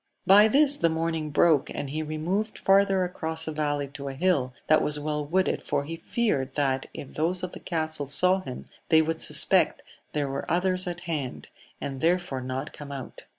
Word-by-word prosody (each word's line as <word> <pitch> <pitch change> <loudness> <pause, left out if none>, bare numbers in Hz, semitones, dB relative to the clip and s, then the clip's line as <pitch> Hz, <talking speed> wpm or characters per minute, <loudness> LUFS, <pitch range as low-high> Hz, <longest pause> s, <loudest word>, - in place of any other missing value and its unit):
By 205 +3 +7
this 285 +4 +5
the 165 - +2
morning 160 -1 -2
broke, 150 0 +3
and 140 - -5
he 155 +2 -2
removed 170 +8 -2
farther 195 -1 +3
across 160 -2 -3
a - - -2
valley 145 -2 -1
to 140 0 -8
a 135 - -5
hill 140 -5 +1
that 155 - +4
was 150 0 0
well 150 0 -2
wooded, 185 +6 0
for 145 -1 -1
he 165 +3 -6
feared 165 - -1
that 135 -2 0
if 140 - -9
those 175 +4 -1
of 180 - -3
the - - -10
castle 155 -4 -3
saw 180 +7 +5
him 130 -8 -8 0.2
they 160 0 +5
would 160 +1 -2
suspect - - +3 0.3
there 145 -2 -1
were 135 0 -5
others 185 +1 +1
at 175 0 -5
hand, 155 -7 -5 0.3
and 135 -2 -5
therefore 170 -5 0
not 130 +3 -5
come 145 -1 -9
out. 135 -2 -8
155 Hz, 195 wpm, -26 LUFS, 145-180 Hz, 0.3 s, By